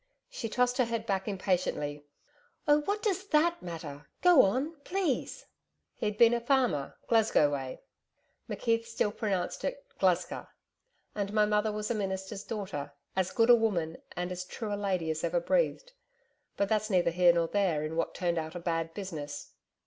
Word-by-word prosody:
She 240 - -4
tossed 250 +2 +1
her 255 - +5
head 230 -1 -3
back 195 -2 -1
impatiently. 180 -7 -1 0.6
'Oh 295 0 +5
what 415 +1 -1
DOES 395 -2 0
that 335 +1 +3
matter! 160 -4 -7 0.2
Go 355 -6 +8
on, 265 +11 0
please.' 350 -1 -2 0.5
'He'd 210 -1 -3
been 235 +1 +7
a 235 - 0
farmer, 245 - +1
Glasgow 220 -10 +4
way' 135 -2 -5 0.7
McKeith 230 -1 0
still 225 -2 0
pronounced 195 -4 -2
it - - -3
'Glesca,' - - +1 0.7
'and 200 -1 -2
my 210 -1 +4
mother 210 +1 +1
was 210 +2 -3
a - - +2
minister's 195 -1 -3
daughter, 185 -11 -5 0.2
as 190 -1 +1
good 245 -3 +4
a - - +10
woman 180 -8 0 0.2
and 180 +1 -2
as 180 0 -4
true 210 +3 -5
a - - +1
lady 185 -5 -1
as 155 0 -4
ever 170 +1 +1
breathed. - - 0 0.7
But 200 - +2
that's 215 +1 0
neither 180 -4 +3
here 175 +1 +6
nor 170 -1 +1
there 180 -6 +1
in 155 +1 -4
what 165 - -1
turned 170 -2 0
out 160 +2 -6
a - - -3
bad 165 -1 -2
business. 150 -8 -6
200 Hz, 170 wpm, -30 LUFS, 170-235 Hz, 0.7 s, a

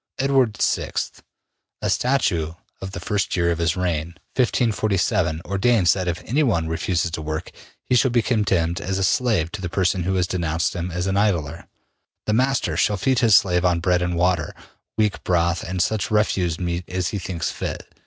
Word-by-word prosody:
Edward 135 -5 +2
VI: - - 0 0.9
A - - +1
statue 90 - +1 0.3
of 95 - -5
the - - -5
first 100 +3 -1
year 85 -1 +2
of 85 - -2
his 85 +1 +1
reign, 85 -2 -2 0.2
1547, 105 -8 +1
ordains 100 -2 +3
that 95 -2 -3
if 85 0 -2
anyone 115 - +1
refuses 85 +1 -1
to 80 - -4
work, 80 +2 -4 0.3
he - - -1
shall 130 +2 +4
be 120 -1 +2
condemned 95 -7 +1
as 95 -1 -2
a 95 - 0
slave 100 -6 +1
to 105 - -6
the 90 - -3
person 95 +1 +1
who 95 +2 -1
has 90 -1 +2
denounced 85 -2 -1
him 90 0 -3
as 90 +1 -3
an 95 0 0
idler. 85 -6 0 0.6
The 105 - 0
master 130 +4 +1
shall 105 -3 +2
feed 130 +6 +1
his 115 -5 +5
slave 90 -3 +3
on 90 -2 +2
bread 90 0 +1
and 90 0 -1
water, 85 -2 0 0.4
weak 105 -2 0
broth 85 0 +1
and 95 +1 -4
such 105 -2 -1
refuse 95 -6 +1
meat 85 -1 -3
as 90 -1 -1
he 105 - -3
thinks 85 -4 -3
fit. - - -5
90 Hz, 185 wpm, -22 LUFS, 85-105 Hz, 0.9 s, his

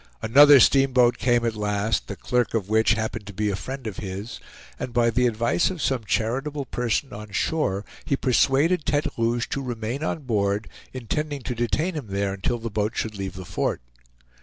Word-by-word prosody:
Another 140 +5 +8
steamboat 125 -2 +4
came 120 0 +2
at 115 - 0
last, 105 - -1
the - - -5
clerk 125 -2 -1
of 105 -4 -1
which 110 +1 +3
happened 110 -1 -4
to 100 - -8
be 105 0 0
a - - -1
friend 130 +5 -6
of 105 -4 -5
his, 100 +3 -6 0.4
and 120 - -5
by 120 -1 +3
the 125 +1 +2
advice 115 +7 +1
of 185 -3 -6
some 130 -6 -1
charitable 135 +8 -1
person 125 +2 -2
on 105 +1 -8
shore 100 -3 -1 0.2
he 140 - 0
persuaded 140 +7 +2
Tete 150 +1 -1
Rouge 115 +1 0
to 135 - -2
remain 120 +2 -4
on 155 - -2
board, 105 -3 0 0.2
intending 140 +3 -3
to 125 - -3
detain 135 +10 -1
him 150 -8 -5
there 100 0 -1
until 100 +5 -2
the 115 -1 -6
boat 105 +2 -1
should 110 -1 -2
leave 95 -1 -5
the 95 -1 -8
fort. - - -2
115 Hz, 190 wpm, -24 LUFS, 105-135 Hz, 0.4 s, Another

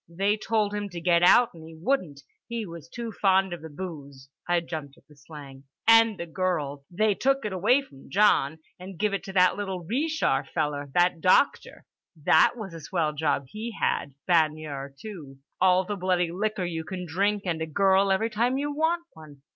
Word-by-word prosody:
They 195 +5 +1
told 215 -1 -1
him 205 -1 -3
to 175 -2 -7
get 170 0 +3
out 235 +7 +5
and 165 -2 -13
he 160 0 -12
wouldn't, 170 - -1 0.3
he 235 -2 -4
was 170 -3 -10
too 235 +1 -6
fond 190 -2 +2
of 175 - -7
the 160 - -9
booze" 145 -5 -9 0.2
(I 175 0 +3
jumped 155 -4 -7
at - - -24
the 150 - -19
slang) 140 -2 -12 0.2
"and 225 -2 +6
the 170 - -4
girls. 160 -5 -2
They 210 +4 +1
took 270 +6 0
it 210 - -3
away 220 +10 +3
from 135 - -17
John 180 -7 +3 0.2
and 185 0 -9
give 210 +1 0
it 200 - -2
to 195 - -7
that 185 0 +4
little 190 -3 -4
Ree 260 - -1
shar 315 +1 +1
feller, 145 -3 -3
that 175 -1 +2
doctor. 185 - +2 0.3
That 160 0 +4
was 205 -6 -7
a 165 - -8
swell 155 -1 -1
job 145 -2 0
he 220 +2 -6
had, 140 - -1
baigneur, 155 -5 0
too. 160 -11 -9 0.2
All 185 0 +4
the 205 - -3
bloody 180 -2 0
liquor 200 0 -2
you 165 -2 -4
can 180 +3 -6
drink 200 +5 0
and 165 -3 -2
a 160 - -2
girl 195 +4 +3
every 220 +4 +1
time 240 +5 +1
you 290 +1 -2
want 325 +3 0
one. 150 -3 -15
180 Hz, 200 wpm, -26 LUFS, 160-210 Hz, 0.3 s, and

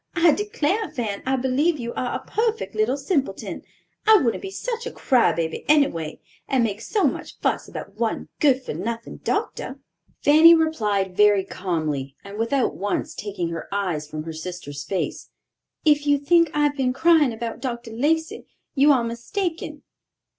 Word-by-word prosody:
I 335 -1 +5
declare, 415 +1 -1
Fan, 225 -8 -3
I 265 - +2
believe 265 +6 +1
you 235 -2 -5
are 250 - -2
a - - -6
perfect 450 0 -1
little 220 +5 +1
simpleton. 280 0 -2 0.5
I 440 0 +9
wouldn't 245 - 0
be 390 - -5
such 470 +3 -4
a - - -5
cry 255 - +3
baby, 160 -1 -3
anyway; 170 - +2 0.3
and 265 -3 +2
make 210 -1 -2
so 410 - -1
much - - -1
fuss - - -1
about 200 +2 -9
one 230 -1 -1
good 265 -3 +3
for - - -5
nothing 230 +8 -5
doctor." - - -3 0.4
Fanny 315 +3 +8
replied 210 - 0
very 205 -1 +5
calmly, 155 -8 -3
and 200 +2 -9
without 245 +3 +1
once 200 +1 -2
taking 195 -5 -4
her 165 0 -5
eyes 175 -7 -2
from 155 0 -5
her 165 0 -6
sister's 160 -3 -7
face, 185 +4 -3 0.6
"If 295 -1 +3
you 285 0 +5
think 335 +3 +3
I 295 - +1
have 290 -1 +2
been 260 -2 0
crying 320 -2 +4
about 230 0 -5
Dr. 235 -3 -4
Lacey, 320 +8 -1 0.3
you 285 +2 +5
are 255 -4 +3
mistaken." 305 - -4
250 Hz, 170 wpm, -23 LUFS, 200-305 Hz, 0.6 s, I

